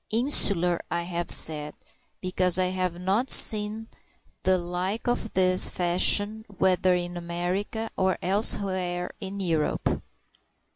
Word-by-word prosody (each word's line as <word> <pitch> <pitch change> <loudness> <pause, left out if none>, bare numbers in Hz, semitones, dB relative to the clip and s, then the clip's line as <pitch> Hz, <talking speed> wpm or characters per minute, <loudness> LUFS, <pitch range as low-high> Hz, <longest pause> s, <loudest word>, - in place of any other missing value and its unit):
Insular 200 - 0
I 170 0 -3
have 175 0 -6
said, 150 -1 +3 0.5
because 185 -1 +1
I 185 -1 0
have 185 -2 -4
not 200 +8 -2
seen 215 +1 +5 0.5
the 185 0 +1
like 180 +4 -5
of 240 -2 -3
this 185 0 +5
fashion 205 +4 0
whether 185 -1 +1
in 175 0 -5
America 180 +6 -5
or 190 -1 -1
elsewhere 185 -3 +1
in 195 0 -8
Europe. 165 -5 -2
185 Hz, 115 wpm, -24 LUFS, 175-200 Hz, 0.5 s, seen